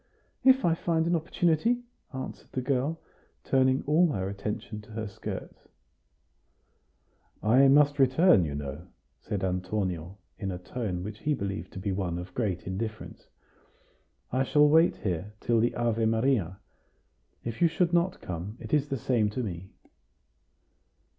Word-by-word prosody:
"If 265 -3 +5
I 170 - +4
find 165 -1 0
an 170 +1 +2
opportunity," 170 +8 +1 0.3
answered 130 -1 -7
the 130 - -1
girl, 140 +5 0 0.4
turning 130 0 +2
all 160 +3 +4
her 95 -2 -2
attention 105 +2 -5
to 105 - -16
her 110 0 -3
skirts. 100 - -7 1.8
"I 125 +6 +6
must 145 +1 +5
return, 135 - +5
you 75 -3 -3
know," 75 +4 -6 0.3
said 100 +4 -4
Antonio, 90 -1 -2 0.2
in 95 - -3
a 90 - -3
tone 90 -1 -4
which 105 +2 -7
he 150 -1 0
believed 100 -3 -4
to 95 - -6
be 100 +1 -2
one 95 -3 -2
of 90 +1 -7
great 100 -7 -2
indifference. 110 +4 -5 1.0
"I 130 - +1
shall 150 +2 +4
wait 160 +3 +5
here 95 +1 -3
till 120 -1 +2
the 120 +2 +1
Ave 115 -2 +1
Maria. 110 -6 +1 0.9
If 115 +7 -5
you 170 - +7
should 170 +2 0
not 175 +1 +1
come, 90 +6 -6
it - - -8
is 145 -1 +2
the 135 - -1
same 115 -3 +1
to 125 +4 -3
me." 95 -3 -6
115 Hz, 150 wpm, -28 LUFS, 95-145 Hz, 1.8 s, you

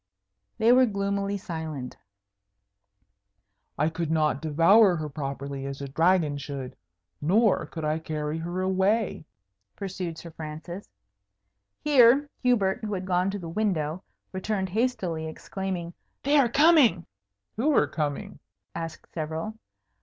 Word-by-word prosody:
They 225 +1 +4
were 255 0 +6
gloomily 200 -1 -1
silent. 160 -8 -6 1.8
"I 150 +3 +2
could 165 0 -3
not 155 -4 +1
devour 170 +6 +5
her 155 -2 -4
properly 140 -1 -5
as 140 0 -6
a 140 - -5
dragon 160 0 +2
should. 135 -2 -6 0.5
Nor 205 +7 +3
could 160 -2 -5
I 155 +1 0
carry 155 0 -3
her 175 +3 -3
away," 190 0 +1 0.5
pursued 185 -4 -5
Sir 170 - -9
Francis. 160 +5 -8 0.9
Here 275 -1 +6
Hubert, 220 -6 +2
who 210 -2 -2
had 185 0 -4
gone 180 0 +1
to 200 - -3
the 175 -4 -7
window, 170 -3 -1 0.3
returned 190 0 -2
hastily, 190 -7 -1
exclaiming, 175 +1 -5 0.3
"They 285 +2 +4
are 255 -4 +4
coming!" 285 - +5 0.5
"Who 275 +8 +2
are - - +5
coming?" 145 -3 -3 0.3
asked 165 -1 -6
several. 160 +6 -3
175 Hz, 125 wpm, -27 LUFS, 155-205 Hz, 1.8 s, were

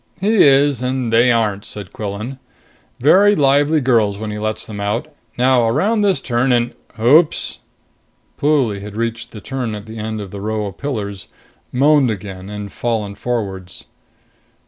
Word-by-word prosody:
"He 210 +3 +3
is 140 -2 +4
and 125 -2 -2
they 120 +2 +5
aren't," 105 -4 0
said 100 -5 -8
Quillan. 105 +6 -5 0.6
"Very 195 +10 +5
lively 145 +1 +3
girls 115 -6 +2
when 110 0 -5
he 105 - -5
lets 110 0 -2
them 105 -2 -8
out. 105 +7 -2 0.3
Now 125 -1 +3
around 200 - +1
this 195 -7 +2
turn 125 +1 0
and... 120 0 +1 0.3
oops!" 150 +8 +3 0.8
Pluly 135 -9 +1
had 105 0 -8
reached 115 +1 -3
the 110 - -10
turn 125 -2 -4
at 105 0 -8
the 110 0 -9
end 110 0 -4
of 100 -3 -7
the 100 - -7
row 110 0 -2
of 100 -3 -8
pillars, 105 -9 -4 0.4
moaned 140 0 +4
again 95 -2 -6
and 105 -1 -6
fallen 110 -4 -2
forwards. 100 -5 -5
115 Hz, 160 wpm, -18 LUFS, 105-135 Hz, 0.8 s, they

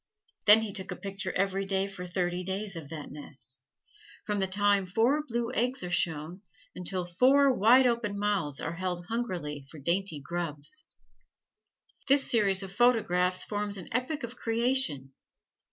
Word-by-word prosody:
Then 215 +1 +9
he 215 -3 -4
took 190 -2 -5
a - - -3
picture 195 -1 -4
every 195 0 0
day 195 0 0
for 195 -2 -7
thirty 180 0 -1
days 195 +1 -3
of 160 -4 -7
that 155 -2 -7
nest 140 -2 -7 0.7
from 210 -1 -1
the 190 - +1
time 200 0 +2
four 235 +10 +2
blue 235 0 -2
eggs 250 +1 0
are 180 - -4
shown 170 +1 -1 0.3
until 180 0 -2
four, 260 +10 +4
wide 245 +4 +6
open 230 -4 0
mouths 200 -9 -1
are 165 - -3
held 180 -1 -3
hungrily 175 - -3
for 160 - -11
dainty 170 +2 0
grubs. 170 - -5 1.2
This 280 0 +4
series 200 -4 +2
of 190 -1 -8
photographs 190 -6 +3
forms 205 -1 -3
an 180 - -9
Epic 255 +5 -1
of 235 +1 -6
Creation. 230 - 0
195 Hz, 155 wpm, -29 LUFS, 175-230 Hz, 1.2 s, Then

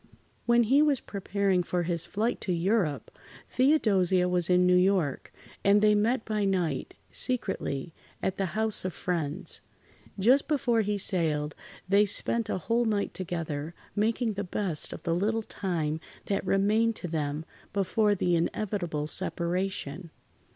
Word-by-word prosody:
When 240 0 +5
he 265 +6 +4
was 295 -4 +3
preparing 200 -1 0
for 175 0 -1
his 170 0 -2
flight 220 +4 -1
to 190 - -1
Europe, 175 -3 0 0.4
Theodosia 195 - +3
was 180 -1 +2
in 180 0 +4
New 180 0 +5
York, 180 -6 +1 0.3
and 200 +1 +5
they 210 0 +5
met 220 +3 +1
by 215 -2 -1
night, 180 -8 -1 0.2
secretly, 190 - -1 0.3
at 190 - -2
the 195 - 0
house 220 -1 0
of 185 -2 -3
friends. 165 -5 -3 0.6
Just 250 +9 +4
before 250 -6 +2
he 210 0 -1
sailed, 155 -7 -1 0.3
they 200 +2 +4
spent 230 +2 0
a - - 0
whole 230 +6 0
night 210 -2 0
together, 165 -3 -4 0.2
making 220 +2 +1
the 200 0 -3
best 180 -4 -2
of - - -8
the 170 - 0
little 215 +6 0
time 160 -7 -2 0.3
that 195 - -1
remained 215 +4 +2
to 180 - -4
them 155 -1 -2 0.3
before 205 +2 +2
the 175 -2 +1
inevitable 170 -3 -1
separation. 175 -1 -2
195 Hz, 145 wpm, -28 LUFS, 170-215 Hz, 0.6 s, When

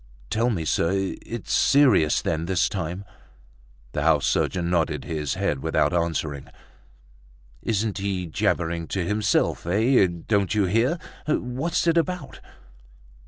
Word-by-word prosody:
"Tell 115 +3 +2
me, 85 -9 -2
sir, 95 +5 0
it's 115 -2 -5
serious 125 - +4
then 80 0 -1
this 95 -1 +2
time?" 90 +1 -4 0.9
The 75 - -2
house 75 -2 +3
surgeon 85 -2 0
nodded 80 -5 0
his 75 -2 -2
head 95 -7 -1
without 65 - +1
answering. 80 -5 -2 1.1
"Isn't 110 -2 -1
he 95 -2 -2
jabbering 85 0 -1
to 95 -3 -2
himself? 105 -3 0
Eh! 110 +3 +4 0.2
don't 100 -2 +1
you 105 -2 +3
hear? 115 - +1 0.3
What's 150 +4 -1
it 170 0 +3
about? 170 -3 -2
95 Hz, 125 wpm, -24 LUFS, 85-115 Hz, 1.1 s, serious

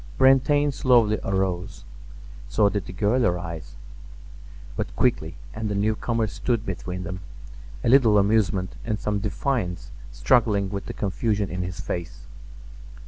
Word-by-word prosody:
Brantain 140 +2 +4
slowly 120 -5 +3
arose; 95 -2 -2 0.6
so 105 -2 +3
did 100 -1 -3
the - - -6
girl 105 +6 +1
arise, 85 - -2 1.0
but - - -4
quickly, - - 0 0.2
and 110 -1 -3
the 105 - -2
newcomer 110 +2 0
stood 115 +1 -2
between 90 0 -5
them, 95 -1 -5 0.6
a - - -1
little 115 -4 +6
amusement 100 -2 +2
and 110 -2 -2
some 105 -1 -1
defiance 100 -2 -2 0.2
struggling 100 - +2
with 100 -1 -5
the - - -5
confusion 105 -1 -1
in 90 +1 -3
his 90 0 -5
face. 85 -9 -5
100 Hz, 135 wpm, -24 LUFS, 90-115 Hz, 1.0 s, little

